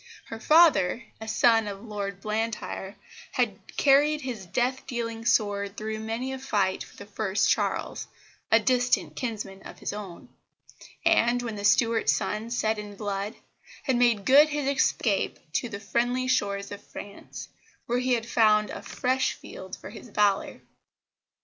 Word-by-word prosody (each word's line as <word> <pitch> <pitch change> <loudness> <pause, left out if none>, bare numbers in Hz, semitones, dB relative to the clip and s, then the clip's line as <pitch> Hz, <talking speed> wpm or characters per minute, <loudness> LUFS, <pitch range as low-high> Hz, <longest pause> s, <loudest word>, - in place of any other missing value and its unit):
Her 225 - -6
father, 255 - +5 0.2
a 220 - -6
son 225 0 +4
of 200 -1 -6
Lord 200 -3 -5
Blantyre, 215 -2 -3 0.4
had - - 0 0.2
carried 295 +2 +4
his 235 -9 -6
death 250 +8 -1
dealing 230 -2 -4
sword 205 -3 +1
through 215 0 -4
many 225 +4 -3
a 265 - -5
fight 200 -7 0
for - - -16
the - - -9
first 205 -1 0
Charles, - - -1 0.4
a 225 - +7
distant 235 - +1
kinsman 210 -6 -5
of - - -11
his - - -4
own; 200 -4 -8 0.8
and, 245 -7 +3
when 230 -3 -4
the 205 - -6
Stuart 225 +2 +3
sun 215 +2 0
set 220 -2 0
in 205 -1 -8
blood, 200 +1 -3 0.5
had 265 - +1
made 235 -5 +3
good 290 +5 +7
his 295 -2 -2
escape 250 -6 +1 0.2
to 245 - -1
the 200 -3 -6
friendly 245 +4 0
shores 200 -5 0
of 205 - -7
France, 200 0 -9 0.4
where 245 +1 0
he 255 0 +1
had 230 -2 0
found 215 -2 +3
a - - -6
fresh 260 +1 0
field 190 0 -9
for - - -10
his 240 - -11
valour. 205 -1 +1
220 Hz, 155 wpm, -27 LUFS, 205-245 Hz, 0.8 s, a